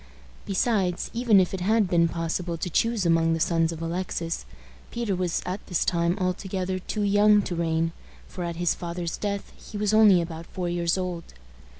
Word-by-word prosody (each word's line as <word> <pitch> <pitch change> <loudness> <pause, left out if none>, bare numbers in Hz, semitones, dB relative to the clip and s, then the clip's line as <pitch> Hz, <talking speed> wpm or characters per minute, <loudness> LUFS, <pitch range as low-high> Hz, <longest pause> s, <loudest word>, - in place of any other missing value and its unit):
Besides, 195 -3 0
even 230 -4 +4
if 185 0 +1
it 190 - -3
had 215 +2 +3
been 170 -1 +3
possible 165 +1 -3
to 175 +2 -4
choose 230 +1 +1
among 165 -1 +3
the 165 - -1
sons 165 0 +2
of 165 0 -6
Alexis, 165 - -3 0.4
Peter 235 -5 -2
was 180 -2 -1
at 185 +3 -4
this 180 - 0
time 170 +1 +1
altogether 185 0 -2
too 210 +3 -3
young 205 +1 +5
to 175 - -4
reign, 165 0 0 0.4
for 180 - -6
at 170 -1 -3
his 175 0 +1
father's 170 -1 -4
death 200 -1 -4
he 210 - -9
was 210 0 0
only 215 -4 +7
about 165 -1 -5
four 180 -2 -4
years 170 +1 0
old. 180 - -5
180 Hz, 185 wpm, -26 LUFS, 170-200 Hz, 0.4 s, only